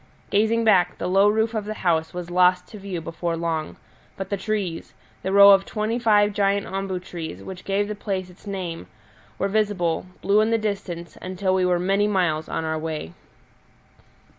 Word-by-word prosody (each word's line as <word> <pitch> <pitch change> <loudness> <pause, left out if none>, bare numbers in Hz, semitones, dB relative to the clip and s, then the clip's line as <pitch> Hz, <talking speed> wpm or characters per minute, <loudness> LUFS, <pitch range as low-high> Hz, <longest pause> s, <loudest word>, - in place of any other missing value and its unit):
Gazing 220 +3 +2
back, 195 -5 +3
the - - -4
low 195 +3 +4
roof 220 +2 +1
of 215 -2 -2
the 215 +1 -4
house 160 -4 0
was 175 -1 -6
lost 180 0 +4
to 215 - -10
view 190 -4 -5
before 165 +1 -3
long, 165 -2 -3 0.4
but 195 0 -6
the - - +2
trees 195 -4 -3 0.3
the 190 - -2
row 200 0 +9
of 195 -1 +6
twenty 215 +4 -2
five 210 -3 +3
giant 200 0 +1
ombu 195 -1 -3
trees 165 - -7
which 185 - -8
gave 200 +1 0
the 210 - -3
place 195 -3 -3
its 180 +3 -17
name 180 -4 -5 0.5
were 195 - 0
visible, 195 -5 0 0.2
blue 205 +2 +4
in 220 - +2
the 230 - +3
distance, 195 -6 -4
until 185 +1 -1
we 185 -1 +2
were 180 -1 +2
many 195 +3 +1
miles 175 -6 0
on 160 - -2
our 160 0 -1
way. 155 - -5
190 Hz, 190 wpm, -23 LUFS, 175-205 Hz, 0.5 s, row